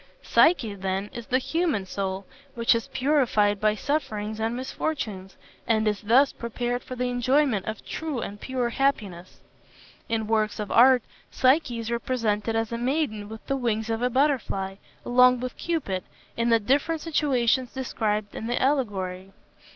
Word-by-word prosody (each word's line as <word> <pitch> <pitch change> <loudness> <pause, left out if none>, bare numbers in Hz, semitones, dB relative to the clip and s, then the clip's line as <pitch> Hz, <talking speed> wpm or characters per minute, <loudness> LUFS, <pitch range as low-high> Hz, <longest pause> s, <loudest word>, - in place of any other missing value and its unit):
Psyche, 260 - +3
then, 195 +1 -3
is 235 -1 -7
the 255 - +2
human 305 - -1
soul, 190 0 -3 0.3
which 230 -1 +3
is 230 -1 -2
purified 250 -7 +2
by 215 0 +3
sufferings 215 -5 -2
and 225 +2 -1
misfortunes, 240 -7 -4 0.3
and 220 -1 +2
is 210 -1 0
thus 250 +6 +4
prepared 240 +1 -3
for 255 - -8
the 250 0 -1
enjoyment 245 -3 +1
of 215 -1 -5
true 310 -5 -4
and 205 -2 -6
pure 255 -2 -1
happiness. 210 -10 -2 0.7
In 225 -1 0
works 215 -1 0
of 210 -2 -4
art 250 0 +6 0.3
Psyche 260 -2 +2
is 230 0 -4
represented 225 -2 -1
as 225 0 -1
a 235 - -3
maiden 240 -6 -1
with 220 0 -10
the 275 - -1
wings 230 -3 -1
of 225 +1 -2
a 250 - +2
butterfly, 235 -8 0 0.3
along 250 0 +5
with 250 0 -5
Cupid, 270 - -2 0.3
in 235 0 0
the 230 -1 +5
different 285 +8 +1
situations 260 -5 +1
described 215 -5 -2
in 225 - -5
the 240 - 0
allegory. 195 -9 -1
235 Hz, 160 wpm, -26 LUFS, 210-260 Hz, 0.7 s, art